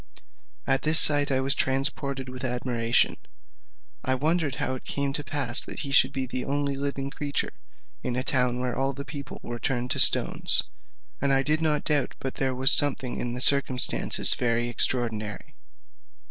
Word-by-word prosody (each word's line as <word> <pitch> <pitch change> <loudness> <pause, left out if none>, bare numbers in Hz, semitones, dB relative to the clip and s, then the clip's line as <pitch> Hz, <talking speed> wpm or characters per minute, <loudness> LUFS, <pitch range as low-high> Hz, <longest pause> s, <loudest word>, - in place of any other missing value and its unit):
At 135 0 0
this 155 +1 +4
sight 145 -1 +6
I 130 0 0
was 135 +1 +1
transported 135 0 -2
with 130 +1 -10
admiration. 120 -2 -1 0.9
I 130 - -1
wondered 155 0 -2
how 130 - -4
it 130 - -9
came 140 -1 -4
to 150 -1 -4
pass 135 -4 0
that - - -8
he 140 - -6
should 135 -1 +3
be 135 -2 -5
the 125 0 -6
only 140 0 -3
living 140 0 -5
creature 145 -1 -4 0.5
in 120 - -5
a 125 - -3
town 125 -2 -1
where 125 -1 -4
all 135 +1 -3
the 140 +1 -9
people 140 -3 -10
were 120 0 -8
turned 120 +1 -3
into - - -2
stones, - - +5 0.6
and 140 0 0
I 135 0 +2
did 155 +3 -1
not 150 -2 0
doubt 150 -3 0
but 135 - -6
there 130 -1 -3
was 130 +3 +5
something 135 -3 +1
in 120 -1 -4
the 125 - -6
circumstance 135 -2 +3 0.2
very 120 0 -2
extraordinary. 110 -4 -1
135 Hz, 175 wpm, -24 LUFS, 125-140 Hz, 0.9 s, sight